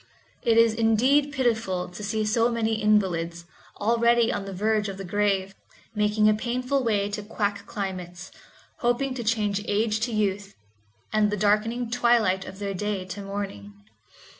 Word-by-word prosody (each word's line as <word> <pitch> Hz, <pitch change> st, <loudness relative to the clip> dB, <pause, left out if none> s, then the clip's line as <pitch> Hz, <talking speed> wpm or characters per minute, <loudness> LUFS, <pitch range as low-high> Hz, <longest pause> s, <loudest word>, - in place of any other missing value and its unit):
It 230 Hz, -3 st, +2 dB
is 230 Hz, -1 st, +5 dB
indeed 250 Hz, +6 st, +3 dB
pitiful 225 Hz, -9 st, 0 dB
to 180 Hz, +4 st, -9 dB
see 215 Hz, +1 st, -1 dB
so 230 Hz, +2 st, +2 dB
many 225 Hz, -2 st, -1 dB
invalids, 170 Hz, -5 st, +1 dB, 0.3 s
already 235 Hz, +1 st, +3 dB
on 195 Hz, -, -3 dB
the 195 Hz, -, -6 dB
verge 210 Hz, +2 st, 0 dB
of 195 Hz, -, -6 dB
the 195 Hz, -, -6 dB
grave, 195 Hz, 0 st, 0 dB, 0.4 s
making 210 Hz, 0 st, +2 dB
a 215 Hz, -, +5 dB
painful 250 Hz, +5 st, -1 dB
way 205 Hz, -4 st, +1 dB
to 210 Hz, +1 st, -3 dB
quack 205 Hz, -1 st, -3 dB
climates, 185 Hz, -3 st, -6 dB, 0.5 s
hoping 245 Hz, +3 st, 0 dB
to 250 Hz, -2 st, -5 dB
change 210 Hz, -3 st, 0 dB
age 215 Hz, +1 st, +1 dB
to 230 Hz, +2 st, -1 dB
youth, 205 Hz, -2 st, -1 dB, 0.6 s
and 215 Hz, -1 st, +3 dB
the 210 Hz, -, -2 dB
darkening 215 Hz, +4 st, +1 dB
twilight 230 Hz, -6 st, +2 dB
of 190 Hz, -, -9 dB
their 200 Hz, -1 st, -3 dB
day 200 Hz, 0 st, -3 dB
to 185 Hz, +2 st, -7 dB
morning. 195 Hz, -, -6 dB
210 Hz, 160 wpm, -25 LUFS, 195-230 Hz, 0.6 s, is